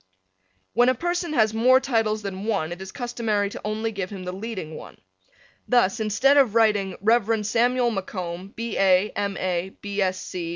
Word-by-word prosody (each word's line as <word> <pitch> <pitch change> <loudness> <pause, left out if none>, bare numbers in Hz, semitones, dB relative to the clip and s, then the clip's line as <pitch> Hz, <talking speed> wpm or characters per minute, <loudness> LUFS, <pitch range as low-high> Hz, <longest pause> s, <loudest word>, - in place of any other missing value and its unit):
When 245 +2 +4
a 255 - +2
person 345 +3 -2
has 220 -6 +3
more 250 +4 +5
titles 225 -5 0
than 195 0 -5
one 195 -8 -1
it 175 +2 -7
is 190 - -7
customary 230 -5 -2
to - - -8
only 220 +1 -2
give 195 -3 -4
him 195 -3 -7
the 180 - -4
leading 190 -5 -6
one. - - -11 0.7
Thus 240 -6 +2
instead 220 +7 +3
of 250 -6 +4
writing 210 -4 +2
Rev. 220 0 +2
Samuel 240 +3 +2
MacComb, 185 -2 -5
B. 230 -1 -4
A., 190 +1 +4
M. 200 -1 -2
A. 185 0 -2
215 Hz, 165 wpm, -24 LUFS, 195-235 Hz, 0.7 s, more